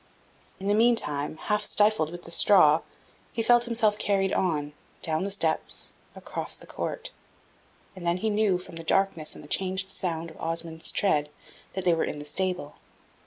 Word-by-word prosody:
In 190 - -7
the 205 - +3
meantime, 185 -11 +2
half 210 +5 0
stifled 210 -7 +4
with 175 +1 -9
the 170 - -10
straw, 165 -4 +6 0.5
he 225 - -2
felt 240 +1 +5
himself 225 -3 +1
carried 195 -2 +1
on, 150 -5 0 0.3
down 160 +3 0
the - - -2
steps, 165 -5 -2 0.2
across - - -4
the - - -14
court; - - -5 0.8
and 185 - -9
then 170 +1 +1
he 220 +3 0
knew, 205 -3 +2
from 180 -2 -10
the 165 - -7
darkness 165 -2 +1
and - - -11
the - - -12
changed 190 +3 -2
sound 165 -2 -3
of - - -14
Osmond's 165 0 -3
tread, 150 -7 +2 0.4
that 190 0 -4
they 175 - +5
were 165 - +1
in - - -3
the 145 - -7
stable. 180 -1 -2
180 Hz, 175 wpm, -27 LUFS, 160-200 Hz, 0.8 s, straw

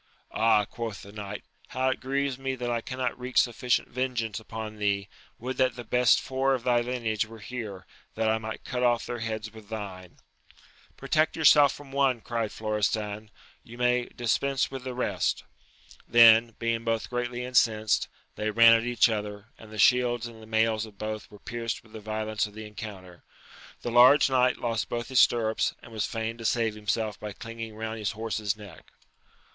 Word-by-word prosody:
Ah, 110 -2 +3
quoth 115 -2 -6
the 100 - -11
knight, 105 -1 -7 0.2
how 130 +1 0
it 130 - -2
grieves 135 0 -1
me 135 0 -2
that 120 -1 -3
I 115 -1 0
cannot 130 0 -3
wreak 125 +1 -5
sufficient 125 0 +2
vengeance 120 -4 -2
upon 110 -1 -7
thee! 100 -1 0 0.3
would 125 +2 -5
that 130 -2 +2
the 120 - -7
best 125 0 +4
four 135 0 0
of 125 - -6
thy 120 -1 +3
lineage 115 -3 -1
were 115 0 -11
here, 105 -3 -7 0.3
that 110 0 0
I 110 0 +2
might 110 0 -6
cut 125 -2 -3
off 120 -1 +2
their 120 - -4
heads 110 -1 -4
with 110 -2 -13
thine! 95 -5 -7 0.8
Protect 155 +3 +1
yourself 150 -3 +6
from 145 -2 -12
one, 135 -3 +2
cried 115 -1 -3
Florestan, 105 0 -2 0.3
you 120 - -12
may 125 0 +2
dispense 135 +4 0
with 135 -1 -7
the 130 -1 -4
rest 125 - -1 0.6
Then, 115 0 +7
being 115 0 -1
both 115 -1 -1
greatly 120 0 -2
incensed, 110 -4 +2 0.3
they 105 0 -1
ran 115 +1 +7
at 115 0 +3
each 120 0 +4
other, 105 -1 -4
and 110 -1 -13
the 110 - -8
shields 120 +2 +3
and 115 -1 -10
the 110 - -13
mails 110 0 +1
of 105 -2 -16
both 110 0 -5
were 105 - -13
pierced 115 +1 -4
with 110 - -20
the 110 - -7
violence 110 0 -2
of 105 - -15
the 110 0 -7
encounter: 100 -4 -9 0.6
the 120 - -2
large 130 +4 +7
knight 125 -1 +3
lost 115 -2 -2
both 120 -1 -3
his 130 - +3
stirrups, 110 -2 +3
and 115 - -13
was 110 -2 -2
fain 115 0 -4
to - - -7
save 115 -1 +1
himself 105 0 -2
by 105 - -6
clinging 115 0 -8
round 110 0 -5
his 105 +1 -2
horse's 110 -2 -2
neck. 100 -6 -13
115 Hz, 185 wpm, -27 LUFS, 110-125 Hz, 0.8 s, Then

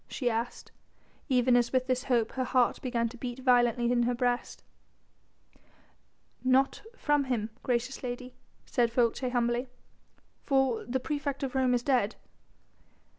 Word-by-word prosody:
she 245 -4 -1
asked, 230 +2 -4 0.6
even 250 -1 +4
as 240 -1 +2
with 255 -1 +1
this 255 -1 -1
hope 235 -4 +1
her 260 - -2
heart 250 -1 +1
began 240 -2 0
to 240 +2 -10
beat 245 0 -5
violently 245 -2 +3
in 245 -1 +3
her 245 +1 +1
breast. 245 0 -1 1.8
"Not 260 +1 +2 0.2
from 295 -1 +1
him, 225 -4 -2
gracious 250 +1 -1
lady," 250 0 -5 0.3
said 240 -2 +1
Folces 245 +1 +1
humbly, 240 +1 0 0.8
"for 270 -4 +1
the 260 +2 -1
praefect 285 0 -3
of 265 - -3
Rome 260 -2 +2
is 240 - -1
dead." 245 -6 +1
250 Hz, 140 wpm, -29 LUFS, 240-260 Hz, 1.8 s, even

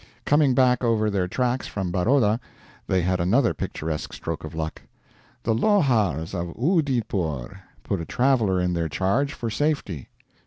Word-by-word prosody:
Coming 145 -3 +4
back 125 -1 +3
over 110 -2 +2
their 95 -3 0
tracks 125 +5 -1
from 95 -3 -3
Baroda, 110 +4 +2 0.5
they 95 -2 +1
had 90 +1 +1
another 95 +4 +3
picturesque 75 +1 -4
stroke 80 -1 -5
of 80 +1 -7
luck: 80 0 -4 0.6
"'The 115 - +1
Lohars 110 - +2
of 85 -2 -4
Oodeypore' 110 - 0 0.2
put 100 -4 -2
a - - -5
traveler 120 -7 +2
in 90 0 0
their 85 -2 -1
charge 100 - 0
for 115 -2 -4
safety." 140 - -1
105 Hz, 150 wpm, -24 LUFS, 85-125 Hz, 0.6 s, Coming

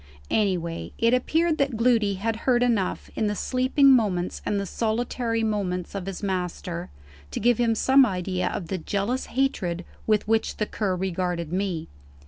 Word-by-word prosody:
Anyway, 175 -5 0
it 230 +1 +3
appeared 320 +6 +2
that 275 -5 +1
Gloody 225 -4 +3
had 220 +4 -1
heard 245 -1 +4
enough, 225 -7 0
in 220 - 0
the 210 - -1
sleeping 260 +4 +3
moments 200 -8 +1
and 205 - +1
the 200 - -2
solitary 230 +2 -1
moments 190 -5 -2
of 195 -2 -5
his 195 +1 -5
master, 180 -2 -3 0.4
to - - -4
give 240 -1 +3
him 230 -2 +2
some 265 +4 +5
idea 185 -4 -1
of 170 -4 -4
the 190 - -2
jealous 200 +9 -2
hatred 185 -10 -1 0.2
with 215 -1 +2
which 225 0 +1
the 215 - 0
Cur 200 -3 -1
regarded 180 -2 -2
me. 185 -4 -2
210 Hz, 165 wpm, -25 LUFS, 185-240 Hz, 0.4 s, some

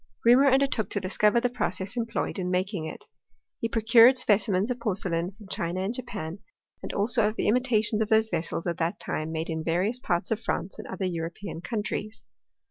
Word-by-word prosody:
Reaumur 260 +4 +6
undertook 265 -4 +1
to 205 - -1
discover 205 +4 +2
the 245 - +1
process 190 -4 -3
employed 230 -3 -2
in 180 -1 -2
making 185 -1 -1
it. - - -7 0.5
He 230 - -2
procured 230 +3 +6
specimens 205 -2 +2
of 250 - -3
porcelain 185 -5 -2
from 210 -3 -13
China 175 +1 -2
and 200 +4 -2
Japan, 205 -9 -6 0.4
and - - -5
also 210 +1 +2
of 215 - -3
the - - -1
imitations 220 -3 +2
of 220 - 0
those 220 0 +3
vessels 165 -2 -3
at 170 -2 -2
that 165 +1 -1
time 155 +1 -3
made 160 +1 -3
in 160 0 -3
various 185 +9 0
parts 175 -5 -1
of 220 - +1
France 200 -4 -3
and - - -7
other 190 0 -4
European 170 +1 -5
countries. 215 +1 -4
205 Hz, 190 wpm, -27 LUFS, 180-230 Hz, 0.5 s, Reaumur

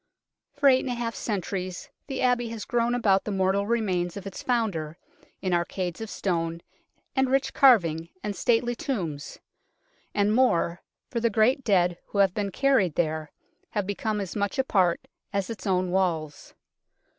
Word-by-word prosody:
For 285 -1 +3
eight 260 -1 +6
and 260 - -4
a 245 - -1
half 235 -1 -3
centuries 185 -4 -4 0.2
the 270 -2 -3
Abbey 245 -2 +2
has 225 -2 -6
grown 240 -1 +1
about 200 -5 +3
the - - -5
mortal 195 +1 +1
remains 190 -6 0
of 200 - -8
its 195 - -6
founder, 190 -11 -1 0.5
in 185 -2 0
arcades 175 +2 -2
of 225 - -5
stone 165 -4 -2 0.5
and 265 -1 +2
rich 270 +1 +1
carving 170 - +4
and 205 -1 -3
stately 240 +2 +2
tombs; 190 - -4 0.8
and 205 +1 +3
more 180 -8 +2 0.3
for 235 - -1
the 235 0 +2
great 225 +6 +3
dead 180 -5 +2
who - - -6
have 195 -2 +4
been 205 -1 -1
carried 200 - +2
there 155 -2 -1 0.4
have 205 -2 0
become 210 +2 -2
as 195 -3 -5
much 200 -2 -1
a 265 - +3
part 185 -8 +1 0.3
as 200 +1 -1
its 225 -1 -6
own 185 -1 +1
walls. 165 -5 -1
200 Hz, 170 wpm, -26 LUFS, 180-235 Hz, 0.8 s, eight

